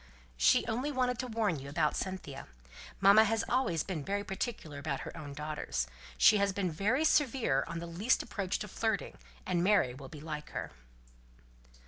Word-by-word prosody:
"She - - +4
only 250 +6 -1
wanted 250 -2 0
to 255 - -2
warn 215 - 0
you 140 +1 -8
about 150 +1 +1
Cynthia. 165 -8 -5 0.5
Mamma 200 +3 +7
has 225 0 +1
always 240 - +1
been 170 -7 -4
very 200 +5 -1
particular 190 - -4
about 140 -1 -3
her - - -7
own 145 -2 -8
daughters. 150 - -3 0.3
She 210 - +7
has 200 0 +2
been 185 -2 -1
very 220 - +1
severe 250 - +2
on - - -5
the 170 - -5
least 185 +9 +1
approach 195 -3 -2
to 210 - -5
flirting, 205 - -2 0.3
and 175 -1 +1
Mary 195 -10 +3
will 135 +1 -10
be 155 - -10
like 150 0 -6
her!" - - -4
190 Hz, 175 wpm, -32 LUFS, 150-220 Hz, 0.5 s, Mamma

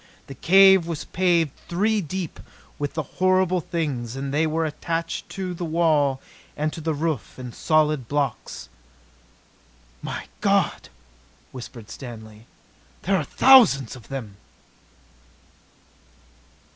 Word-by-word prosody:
The 135 - -9
cave 190 +4 +6
was 165 -3 -4
paved 170 -4 +1 0.2
three 210 +5 +1
deep 180 0 -5 0.4
with 145 0 -3
the 155 - -1 0.2
horrible 185 -1 +3
things, 135 -8 -3
and 135 0 -4
they 155 +2 +2
were 160 +1 0
attached 165 +2 -4
to 185 -2 -4
the 175 - -6
it - - -2
walls 155 -4 +2 0.4
and 155 +2 -3
roof 155 -4 -2
in 125 -2 -8
solid 155 -5 +1
blocks. 140 -3 -3 1.3
"My - - -5 0.2
God!" - - +1 0.6
whispered 120 -3 -10
Stanley. 110 -3 -10 0.6
"There 195 +2 +2
are 175 - +1
thousands 180 - +5
of 120 -5 -14
them!" 110 -8 -7
155 Hz, 115 wpm, -24 LUFS, 135-175 Hz, 1.3 s, cave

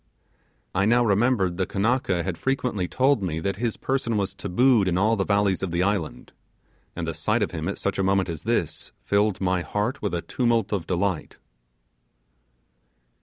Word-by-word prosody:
I 100 - +2
now 120 +2 +4
remembered 100 -4 +2
the 95 - 0
Kanaka 100 -4 0
had 95 -1 -3
frequently 120 -2 -1
told 130 +1 +2
me 85 -4 -2
that 100 +2 -2
his 115 0 -2
person 130 -4 -1
was 100 -2 -1
tabooed 120 +1 +2
in 90 -1 +1
all 110 +4 +3
the 100 - 0
valleys 100 -2 +1
of 95 - -2
the 85 +1 0
island, 100 -5 -2 0.6
and 85 -1 -4
the 80 - -2
sight 105 +9 0
of - - -2
him 80 -2 -4
at 100 - -3
such 100 - -2
a - - +2
moment 95 0 +2
as 80 -4 -5
this - - -2
filled 100 -1 +1
my 90 -1 +1
heart 105 - -2
with 100 -4 -1
a 85 - -3
tumult 115 -4 0
of 90 -5 -2
delight. 90 -1 -2
100 Hz, 180 wpm, -25 LUFS, 90-115 Hz, 0.6 s, now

